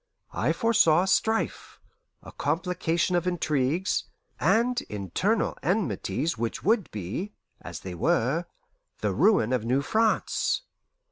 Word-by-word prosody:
I - - +1
foresaw 215 -9 +4
a - - -2
strife, 220 +3 0 0.4
a - - -10
complication 170 +2 -1
of 175 +1 0
intrigues, 160 0 0 0.3
and 245 +2 +2
internal 105 - -1
enmities 170 - -1
which 115 -1 -3
would 215 -2 +2
be 105 - -5 0.3
(as - - -8
they 95 - -6
were) 130 - +1 0.6
the - - 0
ruin 130 - +3
of 125 -4 0
New 130 +4 +1
France. 220 +6 +1
175 Hz, 120 wpm, -27 LUFS, 130-210 Hz, 0.6 s, foresaw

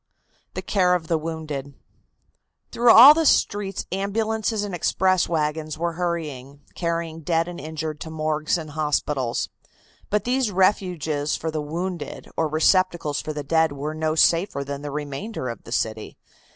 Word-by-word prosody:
THE - - -4
CARE 180 -3 +2
OF 160 -3 -4
THE 165 - +2
WOUNDED. 155 -4 -5 1.0
Through 240 0 +3
all 260 +7 +11
the 325 +1 +1
streets 200 -5 +1
ambulances 215 +2 -1
and 205 -2 -5
express 185 +1 +1
wagons 155 -1 -1
were 170 +1 -1
hurrying, 150 -6 -4
carrying 170 -1 -3
dead 165 +1 0
and 175 -1 -7
injured 155 0 -5
to 160 - -7
morgues 155 +1 -1
and 155 -2 -7
hospitals. 145 -4 -1 0.6
But 210 0 +1
these 250 -1 +1
refuges 180 -6 +1
for 160 - -3
the 155 -1 -2
wounded 170 +3 -5
or 160 - +1
receptacles 160 -1 +2
for 155 - -5
the 150 -1 -5
dead 160 +1 +2
were 145 +2 -4
no 155 0 -1
safer 165 -3 +3
than 140 0 -6
the 145 - -5
remainder 145 - -5
of 115 - -8
the - - -11
city. 110 -2 -2
160 Hz, 155 wpm, -23 LUFS, 150-185 Hz, 1.0 s, all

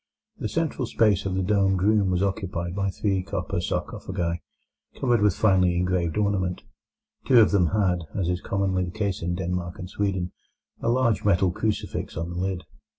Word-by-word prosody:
The - - -2
central 160 -6 -1
space 105 -5 +2
of 95 - -2
the 95 - 0
domed 95 -1 +2
room 105 -2 +3
was 90 +1 +1
occupied 95 -3 -2
by 100 -1 0
three 95 0 0
copper 90 -3 -3
sarcophagi, 85 -1 -3 0.6
covered 120 -4 +2
with 105 -3 +3
finely 90 -4 +3
engraved 90 -1 0
ornament. 95 -4 0 0.6
Two 125 -3 +7
of 110 - +6
them 95 -4 +4
had, 90 -2 +1
as 95 -3 0
is 90 0 -1
commonly 95 -2 0
the - - -5
case 100 -2 -1
in 90 +1 -1
Denmark 90 -1 -3
and 90 - -6
Sweden, 95 -2 -2 0.5
a 115 - 0
large 120 -3 +2
metal 95 -2 +3
crucifix 105 -2 -3
on 85 +2 -3
the - - -6
lid. 90 0 -2
95 Hz, 175 wpm, -25 LUFS, 90-105 Hz, 0.6 s, Two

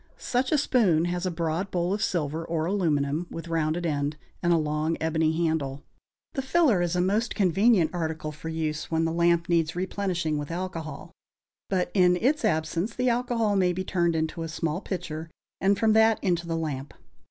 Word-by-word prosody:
Such 255 +1 -1
a 305 - +4
spoon 200 - +3
has 175 +1 -1
a - - +1
broad 170 +2 -2
bowl 180 0 0
of 205 - -2
silver 160 -2 -1
or 160 -1 -2
aluminum, 165 -4 0
with 165 0 -7
rounded 165 +1 0
end, 145 -1 -1 0.2
and 175 - +2
a 170 - +5
long 155 +1 -1
ebony 160 +1 +1
handle. 145 -4 -2 0.5
The 270 - -1
filler 265 - +3
is 175 0 0
a 180 - +2
most 210 +6 0
convenient 195 -1 +3
article 160 -3 -3
for 150 +2 -7
use, 160 -1 -3
when 165 0 +1
the 165 - 0
lamp 170 0 +2
needs 165 -2 +1
replenishing 180 -4 -1
with 145 - -5
alcohol, 170 -3 -5 0.6
but 185 -2 0
in 180 -2 +5
its 265 +10 +1
absence 170 +2 0
the 250 0 +1
alcohol 235 -3 +1
may 180 -2 +3
be 185 +2 -3
turned 170 -3 +1
into 160 +1 -2
a 165 - -3
small 165 +1 -2
pitcher 165 -5 -5 0.3
and 195 +1 +3
from 220 +1 +3
that 220 0 +5
into 175 -3 0
the 165 -1 -1
lamp. 150 -4 -4
170 Hz, 185 wpm, -26 LUFS, 160-190 Hz, 0.6 s, a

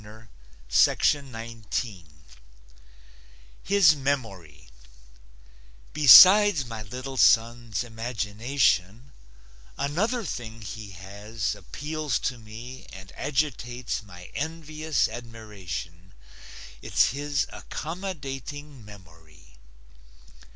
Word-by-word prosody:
HIS 190 -5 +5
MEMORY 100 - -4 1.3
Besides 180 - +8
my 115 -2 -7
little 130 +5 -7
son's 115 -4 +3
imagination, 115 0 -1 0.7
Another 205 - -1
thing 115 -7 -6
he 105 0 -8
has 100 +3 -5
appeals 145 - -4
to 125 - -3
me 115 +4 -11
And 95 0 -11
agitates 125 -4 -2
my 90 -3 -13
envious 155 -1 -2
admiration 95 - -8 0.7
It's - - +2
his 145 +1 -1
accommodating 145 - -7
memory. 80 -8 -17
120 Hz, 65 wpm, -26 LUFS, 105-145 Hz, 1.3 s, Besides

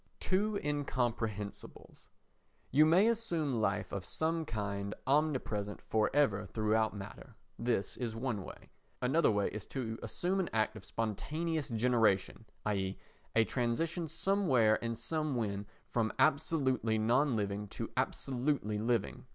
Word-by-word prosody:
Two 200 +2 +1
Incomprehensibles 120 -8 -3 0.6
You 150 +4 +6
may 180 +7 +5
assume 170 - 0
life 100 -2 0
of 100 - -3
some 160 +5 -1
kind 100 -4 -3
omnipresent 130 -8 0
for 110 -1 +1
ever 105 -9 +2
throughout 110 +1 +1
matter. 105 +4 -9 0.2
This 115 -4 0
is 115 -3 -3
one 115 -4 -2
way. - - -11 0.3
Another 135 +7 +3
way 100 -2 +1
is 105 -2 -7
to 115 -4 -4
assume 185 +2 -1
an 185 - 0
act 110 -1 +1
of - - -9
spontaneous 155 - -2
generation, 115 -3 +2 0.2
i.e. 95 -2 -1 0.4
a 115 - +6
transition 155 +9 -1
somewhere 155 - +3
and 115 0 -1
somewhen 120 -11 -2 0.2
from 115 -2 +1
absolutely 135 -7 +2
non 120 +5 +3
living 105 -1 -2
to - - -6
absolutely 125 -5 -1
living. 115 +1 -1
120 Hz, 125 wpm, -33 LUFS, 105-150 Hz, 0.6 s, You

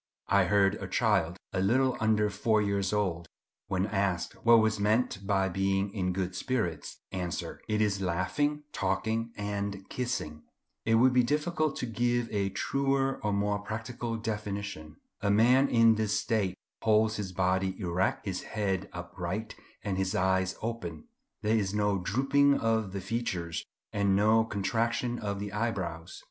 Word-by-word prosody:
I 100 -2 +4
heard 100 +1 +3
a - - -4
child, 85 +3 +1 0.2
a - - 0
little 125 +6 +3
under 105 -1 +2
four 105 +2 +2
years 100 -2 0
old, 90 -5 -1 0.4
when 95 0 0
asked 100 -4 -1
what 115 0 +7
was 110 -1 +2
meant 105 -1 +1
by 95 -1 +2
being 95 +1 0
in 90 -3 -1
good 95 0 -2
spirits, 90 - -2
answer, 90 -2 -4
"It 105 0 +1
is 100 -2 0
laughing, 120 - 0
talking, 110 +4 -1
and 100 -1 -3
kissing." 120 -12 -3 0.4
It 115 - +3
would 125 +3 +5
be 125 - +5
difficult 155 +4 0
to - - -3
give 120 +1 0
a 100 -2 0
truer 135 +6 0
and 105 -1 +1
more 105 0 0
practical 115 +2 -4
definition. 100 -8 -4 0.3
A 100 - +1
man 125 +6 +5
in 115 -1 +6
this 110 -1 0
state 110 -5 0 0.3
holds 110 0 +3
his 100 -3 -4
body 95 +1 0
erect, 90 -1 0
his 95 -3 -3
head 100 -3 -2
upright, 90 +5 -5 0.3
and 95 -3 -2
his 95 0 0
eyes 95 0 +1
open. 115 - -5 0.3
There 110 +1 +2
is 100 -2 0
no 105 -2 +1
drooping 135 +8 +3
of 110 -3 +1
the 100 0 -4
features, 95 -6 -3 0.3
and 100 -2 +2
no 110 +2 +4
contraction 115 +3 -1
of 100 -2 -3
the 100 0 -5
eyebrows. 95 -7 -3
105 Hz, 155 wpm, -29 LUFS, 95-115 Hz, 0.4 s, what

